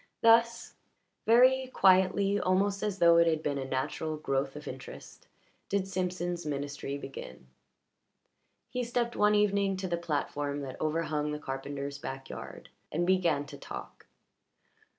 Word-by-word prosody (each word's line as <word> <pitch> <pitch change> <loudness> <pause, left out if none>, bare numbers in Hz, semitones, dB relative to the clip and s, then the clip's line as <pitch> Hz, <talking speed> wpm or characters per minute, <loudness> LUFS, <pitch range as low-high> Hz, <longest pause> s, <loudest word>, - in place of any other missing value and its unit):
Thus, 230 +1 +4 0.5
very 255 +3 +5
quietly, 190 +1 +4
almost 195 +2 +1
as 210 -2 -2
though 170 -2 +6
it 170 0 +5
had 160 -1 +1
been 140 -1 -1
a 135 - -3
natural 145 +4 -2
growth 135 -2 -1
of 150 0 -9
interest, 130 0 -10 0.4
did 195 -1 0
Simpson's 180 -2 -2
ministry 140 -1 -4
begin. 65 - -9 1.3
He 250 +1 -1
stepped 240 0 -1
one 210 0 +4
evening 200 -2 +2
to 190 0 -3
the 170 -1 -1
platform 145 -3 -2
that 130 -2 -7
overhung 155 -1 -1
the - - -2
carpenter's 140 0 -5
backyard, 135 -1 -8 0.2
and 170 +3 0
began 175 -6 +2
to 145 -1 -11
talk. - - -9
170 Hz, 135 wpm, -30 LUFS, 145-200 Hz, 1.3 s, though